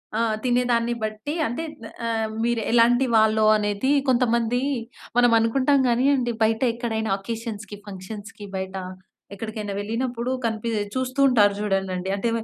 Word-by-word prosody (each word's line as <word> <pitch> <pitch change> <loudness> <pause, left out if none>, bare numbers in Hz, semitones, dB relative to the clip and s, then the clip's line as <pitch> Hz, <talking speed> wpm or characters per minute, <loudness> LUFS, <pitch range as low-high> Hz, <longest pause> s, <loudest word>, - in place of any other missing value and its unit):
ఆ! - - +1 0.2
తినేదాన్ని 240 -1 +1
బట్టీ 215 +7 -3
అంటే, 240 +8 -4 0.2
న్ 225 - -8 0.2
ఆహ్, 225 -1 -1
మీరు 235 -1 +1
ఎలాంటి 240 +2 +4
వాళ్ళో 220 0 +4
అనేదీ 205 +5 0 0.2
కొంతమందీ 240 -1 +2 0.6
మనం 245 -1 +5
అనుకుంటాం 265 +5 +2
గానీయండి, 250 0 +2
బయట 220 0 +1
ఎక్కడైనా 225 -2 -2
అకేషన్స్‌కి, 215 -1 -6
ఫంక్షన్స్‌కి 205 +2 -8
బయట, 190 0 -4 0.6
ఎక్కడికైనా 215 -1 -5
వెళ్ళినప్పుడు 235 +3 -2
కనిపీ 225 0 -2 0.3
చూస్తూ 260 +1 -2
ఉంటారు 210 -6 +4
జూడండండి. 190 -2 -1
అంటే, 230 +4 0
225 Hz, 125 wpm, -24 LUFS, 210-245 Hz, 0.6 s, మనం